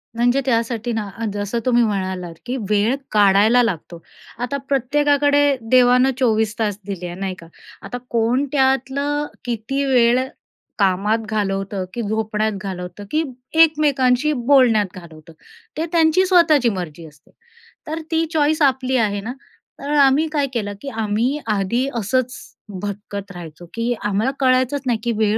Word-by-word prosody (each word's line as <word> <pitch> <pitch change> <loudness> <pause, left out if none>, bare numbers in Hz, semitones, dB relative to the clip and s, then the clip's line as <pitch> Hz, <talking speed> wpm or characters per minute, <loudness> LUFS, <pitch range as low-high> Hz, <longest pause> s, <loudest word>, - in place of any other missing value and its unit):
म्हणजे 245 +3 +2
त्यासाठी 235 -1 0
ना 210 -2 -3 0.2
जसं 205 +3 -2
तुम्ही 240 -1 +4
म्हणालात, 185 -5 -2
की 250 - -3
वेळ 210 +5 +2 0.2
काढायला 210 +3 +5
लागतो. 170 -5 -4 0.4
आता 245 +4 -2
प्रत्येकाकडे 285 +2 +2 0.3
देवानं 250 +1 +5
24 220 -3 +1
तास 210 -3 -1
दिले 195 -3 -5
आहे, 175 - -7
नाही 195 -1 -2
का. 165 - -13 0.3
आता 245 - -6
कोण 235 +4 +1
त्यातलं 275 +2 +1 0.2
किती 245 +4 -2
वेळ 245 -2 +4 0.6
कामात 200 +3 +2
घालवतं, 195 -2 -2
की 240 - -3
झोपण्यात 215 0 -1
घालवतं, 180 0 -6
की 315 +1 +1 0.4
एकमेकांशी 295 -3 +2
बोलण्यात 240 -7 +3
घालवतं. 165 -2 -13 0.4
ते 320 - -1
त्यांची 330 +2 +3
स्वतःची 330 -9 +4
मर्जी 175 -5 -6
असते, 150 0 -21 0.6
तर 315 +1 -3
ती 325 0 +2
चॉईस 310 +1 +2
आपली 265 -2 +2
आहे 205 -4 0
ना. 225 +5 -5 0.5
तर 280 - -6
आम्ही 280 +3 +4
काय 290 -3 0
केलं 205 -4 -2
की 280 - -5
आम्ही 225 +5 -1
आधी 215 +5 0
असंच 250 +3 0 0.5
भटकत 200 0 -6
राहायचो, 175 -1 -10
की 230 +1 -1
आम्हाला 210 +5 0
कळायचंच 260 +1 +2
नाही 240 -3 0
की 240 - 0
वेळ 215 0 +2
235 Hz, 140 wpm, -20 LUFS, 205-270 Hz, 0.6 s, काढायला